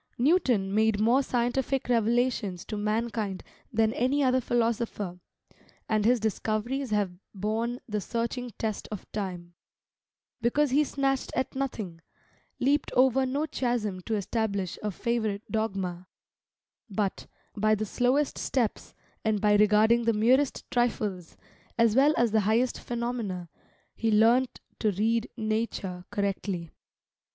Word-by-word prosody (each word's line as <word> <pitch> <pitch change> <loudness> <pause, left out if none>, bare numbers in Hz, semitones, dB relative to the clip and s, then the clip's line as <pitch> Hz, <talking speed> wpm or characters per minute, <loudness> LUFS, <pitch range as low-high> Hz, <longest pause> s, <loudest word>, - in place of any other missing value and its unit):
Newton 245 - +2
made 220 0 +3
more 235 +5 +4
scientific 255 +1 0
revelations 230 -5 +1
to 215 - -5
mankind 210 -2 -2 0.3
than 225 -1 +2
any 270 +4 +1
other 260 0 +3
philosopher; 230 -6 -1 0.7
and 215 -1 +1
his 245 +1 +4
discoveries 220 +5 -1
have 205 -3 +1 0.2
borne 225 +5 -1
the 210 -2 -2
searching 235 +4 -3
test 215 -2 -3
of 210 - -6
time, 180 -4 -5 0.9
because 270 +4 +2
he 290 +3 +4
snatched 270 -2 -1
at 260 0 -1
nothing, 215 -11 -4 0.6
leaped 280 +3 +1
over 260 +1 +4
no 280 +4 0
chasm 235 -10 -2
to 225 - 0
establish 200 -3 -2
a 210 - -1
favourite 215 0 -1
dogma; 190 -5 -2 0.8
but, 200 -1 -2 0.3
by 215 +1 +3
the 215 +1 -2
slowest 255 +7 +1
steps, 240 -5 -1 0.3
and 220 -2 +1
by 210 0 +3
regarding 215 +3 +4
the 230 - +3
merest 255 +6 +2
trifles, 210 -7 -1 0.4
as 230 -2 +4
well 285 +4 +5
as 235 -2 +3
the 220 - +4
highest 225 +5 +1
phenomena, 235 -7 -3 0.5
he 225 - 0
learnt 230 +4 +3 0.2
to 215 - +2
read 225 +4 0
Nature 215 -5 -2
correctly. 195 -4 -2
225 Hz, 125 wpm, -28 LUFS, 205-245 Hz, 0.9 s, well